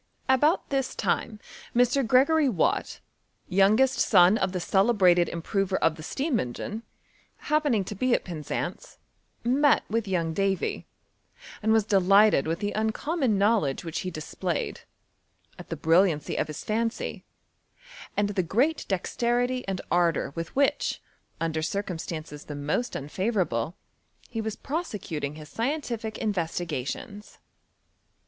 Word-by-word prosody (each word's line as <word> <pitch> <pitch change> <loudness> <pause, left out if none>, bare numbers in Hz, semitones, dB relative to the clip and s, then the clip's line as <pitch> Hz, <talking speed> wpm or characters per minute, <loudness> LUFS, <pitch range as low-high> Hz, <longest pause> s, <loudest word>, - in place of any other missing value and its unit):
About 295 +7 +2
this 270 -2 -1
lime 215 -2 0 0.4
Mr. 245 +3 +4
Gregory 275 +5 +4
Watt, 180 -10 0 0.5
youngest 215 +8 +3
son 185 -1 +6
of 190 -4 0
the 180 - -2
celebrated 190 -3 +3
improver 190 +3 -1
of 165 - +2
the - - -10
steam 270 - -1
engine, 185 - -4 0.6
happening 295 -9 +1
to 190 - -6
be 245 +5 +2
at - - -2
Penzance, 160 -5 -5 0.5
met 275 +4 +3
with 225 -1 0
young 170 -4 0
Davy, 195 +1 -1 0.7
and 220 +1 +1
was 220 -1 +4
delighted 200 -4 +4
with 165 +1 0
the 205 0 -1
uncommon 220 - 0
knowledge 200 -9 +2
which 165 0 -3
he 185 - -3
displayed, 170 +1 -4 0.8
at - - -10
the - - -2
brilliancy 165 -2 +2
of - - 0
bis 155 - -7
fancy, 225 +2 -2 0.9
and 205 0 +2
the 200 -2 0
great 250 - +1
dexterity 245 +6 0
and 190 -2 -2
ardour 170 -5 +2
with 165 0 -6
which, 285 +1 +1 0.4
under 160 -1 -1
cir 195 +6 -1
cumstances 160 -4 -6
the 150 - -6
most 150 +12 -2
unfavourable, 175 - -1 0.5
he 225 -2 -3
was 220 -1 -3
prose 320 0 -4
cuting 150 -4 -4
his 155 -1 -10
scientific, 235 -4 -3
investigations. 175 - -4
200 Hz, 130 wpm, -27 LUFS, 170-240 Hz, 0.9 s, son